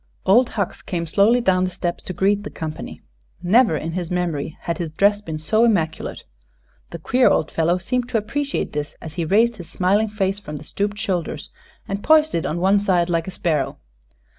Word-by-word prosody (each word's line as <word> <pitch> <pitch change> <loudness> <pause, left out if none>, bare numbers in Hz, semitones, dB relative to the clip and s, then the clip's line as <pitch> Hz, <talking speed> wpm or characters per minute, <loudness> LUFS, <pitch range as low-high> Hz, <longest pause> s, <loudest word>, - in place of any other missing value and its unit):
Old 235 +6 +5
Hucks 200 -3 -2
came 170 -2 -3
slowly 210 +8 +3
down 185 -5 +2
the 185 - 0
steps 175 -1 -4
to 185 - -4
greet 200 +3 +2
the 205 - -7
company. 155 -1 -7 0.4
Never 205 -2 +4
in 165 - -4
his 175 -1 -4
memory 170 -4 -2
had 170 -2 -3
his 170 -2 -2
dress 200 +6 +2
been 160 -6 -5
so 215 +9 +2
immaculate. 170 -9 0 0.7
The 170 - -6
queer 250 +10 +3
old 155 - +1
fellow 165 +2 +1
seemed 245 +7 -2
to 235 - +1
appreciate 275 +7 -2
this 150 0 -4
as 160 - -9
he 170 -1 -2
raised 225 +6 +3
his 175 -3 -10
smiling 200 +4 +1
face 200 -1 -1
from 150 -7 -8
the 145 - -7
stooped 205 +1 -2
shoulders 175 -7 -3 0.4
and 195 +1 -4
poised 315 0 +4
it 165 - -1
on 165 - -2
one 195 +3 +4
side 180 -3 +1
like 165 0 0
a - - -4
sparrow. 160 -6 -1
185 Hz, 200 wpm, -21 LUFS, 165-210 Hz, 0.7 s, Old